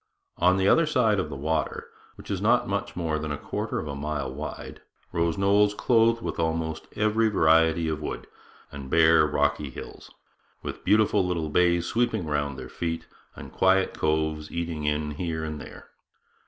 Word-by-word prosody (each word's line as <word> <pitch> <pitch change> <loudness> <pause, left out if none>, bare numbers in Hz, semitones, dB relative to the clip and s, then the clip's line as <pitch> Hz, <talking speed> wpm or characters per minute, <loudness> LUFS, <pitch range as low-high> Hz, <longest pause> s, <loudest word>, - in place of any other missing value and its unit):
On 90 +2 +4
the 95 0 +2
other 165 +7 +4
side 115 -9 +2
of 90 - -2
the 70 - -6
water, 80 +3 -2 0.3
which - - -10
is 95 -2 -2
not 120 +3 +3
much 100 0 -3
more 80 -3 -1
than 75 -1 -4
a 75 - -2
quarter - - -4
of 80 - -4
a 70 - -4
mile 70 -2 -3
wide, 75 +3 -7 0.3
rose 85 -1 0
knolls 100 +1 +3
clothed 115 0 +3
with - - -4
almost 80 -1 -2
every 110 +2 +2
native 110 -2 0
variety 80 +1 +4
of 80 -1 -2
wood, 75 - -5 0.5
and 70 -2 -8
bare 80 0 +5
rocky 75 -1 0
hills, - - -10 0.5
with - - -6
beautiful 105 -2 +3
little 85 -4 -2
bays 85 +1 +2
sweeping 115 -3 0
round 70 -2 -2
their - - -7
feet 80 -1 -4 0.3
and - - -10
quiet 95 0 +3
coves 80 0 -1
eating 85 -3 -3
in 75 0 -1
here 80 +1 -3
and 75 -2 -5
there. - - -12
80 Hz, 180 wpm, -26 LUFS, 75-100 Hz, 0.5 s, bare